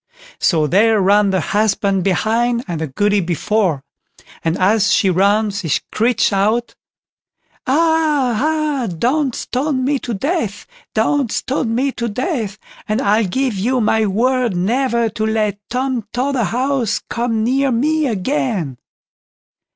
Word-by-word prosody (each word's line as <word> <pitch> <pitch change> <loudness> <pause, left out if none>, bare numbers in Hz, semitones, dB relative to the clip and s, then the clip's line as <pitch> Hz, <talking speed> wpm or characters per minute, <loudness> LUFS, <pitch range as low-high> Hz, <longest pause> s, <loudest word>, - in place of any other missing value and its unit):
So 160 -4 +2
there 210 +7 +3
ran 200 +1 +3
the 190 -1 +1
husband 200 -1 0
behind 235 +6 0
and 170 -3 -4
the 160 - -2
Goody 205 +9 +1
before; 180 -2 0 0.6
and 165 +1 0
as 210 +3 +3
she 195 - +3
ran 205 +4 +2
she 200 -3 -4
screeched 230 - +1
out: 215 +5 +1 0.9
"Ah! 305 -3 +2
ah! 305 -4 0
don't 250 - 0
stone 260 0 -2
me 280 0 +1
to 235 -3 -4
death; 270 - -2 0.3
don't 240 +2 +1
stone 245 -4 -1
me 270 +3 +1
to 235 -2 -3
death! 225 - -3 0.3
and 215 +2 +1
I'll 215 -2 +2
give 260 +5 -1
you 240 +7 0
my 220 -1 +2
word 240 +1 +1
never 235 +5 +1
to 215 +1 -4
let 215 -2 0
Tom 255 -2 -2
Totherhouse 255 -2 0
come 230 -2 -1
near 270 +3 +1
me 300 +5 +1
again." 160 - -2
225 Hz, 135 wpm, -18 LUFS, 200-260 Hz, 0.9 s, there